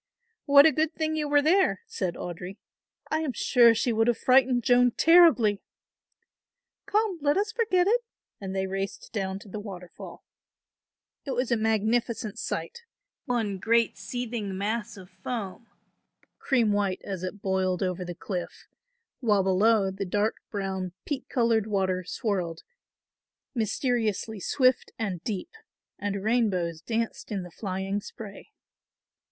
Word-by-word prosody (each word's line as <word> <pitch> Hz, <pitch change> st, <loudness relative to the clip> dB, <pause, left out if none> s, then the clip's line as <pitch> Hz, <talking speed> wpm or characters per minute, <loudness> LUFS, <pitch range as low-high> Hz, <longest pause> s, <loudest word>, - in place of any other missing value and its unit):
"What 280 Hz, 0 st, +8 dB
a 320 Hz, -, +7 dB
good 315 Hz, +1 st, 0 dB
thing 315 Hz, 0 st, -1 dB
you 300 Hz, -1 st, -1 dB
were 290 Hz, 0 st, +4 dB
there," 375 Hz, +8 st, +3 dB
said 185 Hz, -, -3 dB
Audry. 180 Hz, +3 st, -7 dB, 0.5 s
"I 315 Hz, -, +2 dB
am 305 Hz, -5 st, -2 dB
sure 235 Hz, -2 st, +5 dB
she 230 Hz, +1 st, +1 dB
would 225 Hz, +1 st, +2 dB
have 240 Hz, -, +2 dB
frightened 255 Hz, -1 st, +4 dB
Joan 245 Hz, 0 st, +5 dB
terribly." 320 Hz, -, +6 dB, 1.3 s
"Come, 420 Hz, -4 st, +1 dB
let 290 Hz, +3 st, +2 dB
us 415 Hz, +2 st, 0 dB
forget 410 Hz, -7 st, +2 dB
it," 470 Hz, +5 st, +3 dB, 0.4 s
and 195 Hz, -1 st, -5 dB
they 190 Hz, 0 st, 0 dB
raced 195 Hz, +2 st, -5 dB
down 190 Hz, -3 st, -2 dB
to 205 Hz, -, -13 dB
the 205 Hz, +2 st, -6 dB
waterfall. 185 Hz, -4 st, -10 dB, 1.0 s
It 270 Hz, -3 st, -3 dB
was 250 Hz, 0 st, -1 dB
a -, -, +5 dB
magnificent 220 Hz, 0 st, 0 dB
sight, 475 Hz, 0 st, -4 dB, 0.4 s
one 225 Hz, -7 st, -1 dB
great 230 Hz, +2 st, +2 dB
seething 220 Hz, -3 st, -4 dB
mass 215 Hz, +2 st, -2 dB
of 185 Hz, -1 st, -13 dB
foam, 200 Hz, +3 st, -6 dB, 0.7 s
cream 240 Hz, -6 st, +2 dB
white 200 Hz, -2 st, 0 dB
as 190 Hz, -3 st, -5 dB
it 185 Hz, +2 st, -6 dB
boiled 190 Hz, -1 st, 0 dB
over 185 Hz, 0 st, -2 dB
the 175 Hz, -1 st, -6 dB
cliff; 180 Hz, 0 st, -6 dB, 0.5 s
while 210 Hz, -6 st, +2 dB
below, 195 Hz, +1 st, +3 dB
the 195 Hz, +1 st, -4 dB
dark 205 Hz, +3 st, 0 dB
brown 190 Hz, -3 st, -3 dB
peat 290 Hz, -3 st, -4 dB
coloured 230 Hz, -3 st, +2 dB
water 190 Hz, -3 st, 0 dB
swirled, 180 Hz, -4 st, -3 dB, 0.9 s
mysteriously 225 Hz, -2 st, -1 dB
swift 255 Hz, +5 st, +1 dB
and 190 Hz, -6 st, -3 dB
deep, 215 Hz, -, -4 dB, 0.5 s
and 200 Hz, -1 st, -3 dB
rainbows 190 Hz, -8 st, 0 dB
danced 230 Hz, +3 st, -3 dB
in 195 Hz, -3 st, -2 dB
the 180 Hz, -, -10 dB
flying 195 Hz, +1 st, -3 dB
spray. 205 Hz, -, -10 dB
215 Hz, 140 wpm, -27 LUFS, 190-250 Hz, 1.3 s, What